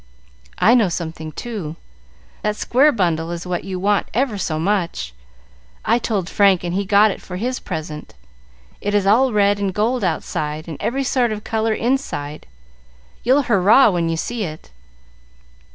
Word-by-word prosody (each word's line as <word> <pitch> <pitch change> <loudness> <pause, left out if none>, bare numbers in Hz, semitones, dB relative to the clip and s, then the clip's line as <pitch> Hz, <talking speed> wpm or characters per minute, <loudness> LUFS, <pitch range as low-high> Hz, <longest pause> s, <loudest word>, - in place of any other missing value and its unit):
"I 230 - +5
know 225 -6 +4
something, 160 -2 -5
too. 195 -7 -6 0.7
That 210 0 -1
square 270 +7 +3
bundle 170 - 0
is 170 0 -5
what 180 -1 -3
you 190 -1 -4
want 205 +2 +1
ever 250 -2 +1
so 175 -5 -2
much. 170 - -1 0.7
I 235 - +3
told 205 -7 -2
Frank, 195 -3 +3
and 175 -1 -3
he 200 +2 -1
got 205 +2 +5
it - - -7
for 180 - -8
his 250 +6 -2
present. 155 - -6 0.7
It 205 0 -1
is 205 -2 +2
all 245 +6 +4
red 205 -1 +3
and 200 -1 0
gold 225 +5 0
outside, 155 -2 -2
and 160 -3 -6
every 270 +3 -1
sort 250 -3 +1
of 210 -1 -5
color 220 0 0
inside; 230 - -2 0.8
you'll 265 +4 +3
hurrah 215 +2 +5
when 170 -2 0
you 165 - -1
see 235 +6 -3
it. 155 - -8
200 Hz, 165 wpm, -20 LUFS, 170-225 Hz, 0.8 s, I